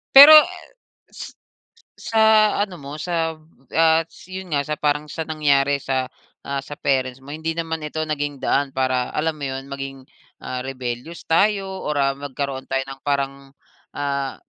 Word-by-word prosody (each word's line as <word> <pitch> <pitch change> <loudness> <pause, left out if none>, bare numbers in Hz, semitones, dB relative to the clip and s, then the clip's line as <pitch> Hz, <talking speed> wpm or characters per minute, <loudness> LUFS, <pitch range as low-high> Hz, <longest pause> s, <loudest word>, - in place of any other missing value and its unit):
Pero 285 +3 +12 0.2
et 365 -1 -11 0.5
s - - -8 0.7
sa 225 - -1 0.4
ano 205 -3 -1
mo, 140 +1 -7
sab 165 -2 -3 0.2
ats 165 +2 +1
yun 185 -1 -8
nga, 145 - +2
sa 150 - -1
parang, 150 0 0
sa 160 +2 -4
nangyari 145 -2 +2
sa, 130 -1 -1 0.4
ah, 140 0 -3
sa 145 - -8
parents 130 -2 0
mo. 140 - -10
Hindi 160 +1 -3
naman 160 -1 -3
ito 150 +1 -4
naging 145 -2 -3
daan 140 -1 +1
para 130 -1 +1
alam 160 +1 0
mo 145 - -7
yun, 135 0 -5
maging, 135 -1 -6 0.4
ah, 125 - -4
rebellious 130 +4 -6
tayo, 195 +4 +3 0.2
or, 150 - -3
ah, 135 0 +3
magkaroon 140 -1 -5
tayo 135 0 -1
ng 135 - -10
parang 140 0 -2 0.4
ah, 140 -2 -2
145 Hz, 160 wpm, -22 LUFS, 135-160 Hz, 0.7 s, Pero